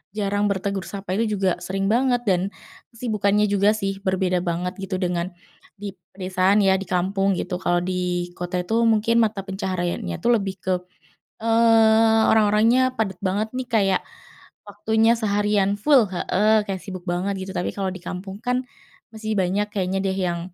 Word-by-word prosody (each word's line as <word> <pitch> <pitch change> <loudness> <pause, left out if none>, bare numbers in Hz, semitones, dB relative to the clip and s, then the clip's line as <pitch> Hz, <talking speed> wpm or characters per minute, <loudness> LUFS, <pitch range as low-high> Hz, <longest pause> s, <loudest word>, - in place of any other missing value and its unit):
jarang 205 0 0
bertegur 200 -1 -2
sapa, 200 -2 -6
itu 220 -2 0
juga 190 -2 0
sering 195 +2 -2
banget 245 +1 +2
dan 190 -4 +1 0.5
kesibukannya 210 -3 +1
juga 205 +1 +3
sih, 195 -2 -3
berbeda 185 -2 0
banget 180 +1 -2
gitu, 195 0 -4
dengan 175 -1 -1 0.5
di 200 0 -6 0.2
pedesaan 190 +2 +2
ya, 190 0 +3
di 195 - -6
kampung 190 +2 +1
gitu. 180 - -3
Kalau 175 -1 +2
di 180 -1 -2
kota 180 0 -2
itu 225 +6 0
mungkin 225 +1 +3
mata 215 -3 0
pencahariannya 185 - -3
itu - - -2
lebih 200 -4 0
ke, 185 - +1 0.7
eee, 225 -1 +4
orang-orangnya 220 +4 +3
padat 215 -5 -2
banget 205 +3 0
nih, 255 -1 -3
kayak 195 -4 +2 0.6
waktunya 220 +3 +1
seharian 205 -2 +1
full 270 -3 +5
heeh, 210 +4 +2
kayak 195 -2 -4
sibuk 185 -3 -7
banget 185 +3 -1
gitu, 190 0 -6
tapi 180 - -2
kalau 195 -1 -1
di 185 -1 -9
kampung 190 +2 -6
kan 250 +1 0 0.5
masih 220 -1 -4
banyak 195 +2 +1
kayaknya 190 -1 -1
deh, 190 -1 -1
yang 175 -2 -1
195 Hz, 160 wpm, -23 LUFS, 185-220 Hz, 0.7 s, full